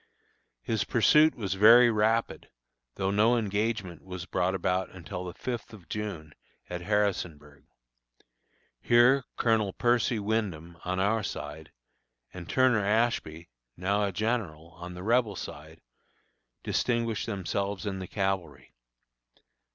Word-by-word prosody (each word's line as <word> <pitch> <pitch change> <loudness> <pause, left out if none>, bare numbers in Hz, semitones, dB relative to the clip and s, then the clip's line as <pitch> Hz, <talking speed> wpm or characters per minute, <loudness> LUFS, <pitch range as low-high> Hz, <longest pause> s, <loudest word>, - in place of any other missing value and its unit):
His 110 -4 0
pursuit 150 +9 +4
was 100 -5 -3
very 115 +5 +7
rapid, 110 +1 0 0.5
though 95 0 -1
no 110 +4 +3
engagement 105 -3 -2
was 90 -1 -7
brought 95 0 0
about 90 0 -1
until 90 0 -7
the 90 -1 -7
fifth 120 -3 -5
of 95 -6 -13
June, 90 -8 -5 0.4
at 90 0 -4
Harrisonburg. 85 -8 -2 1.2
Here 120 +3 +5
Colonel 110 -4 +1
Percy 120 -1 +1
Wyndham, 100 -6 -2
on 95 +1 -2
our 105 +4 +2
side, 80 -5 -7 0.6
and 85 -2 -9
Turner 130 -5 +3
Ashby, 105 -7 0 0.3
now 100 +4 0
a 100 - 0
general, 95 -7 -2
on 90 +1 -9
the 90 - -8
Rebel 115 -1 +2
side, 80 -1 -9 0.8
distinguished 115 -3 -1
themselves 100 0 -3
in 95 -2 -3
the 95 - -6
cavalry. 90 -10 -3
100 Hz, 120 wpm, -28 LUFS, 90-115 Hz, 1.2 s, very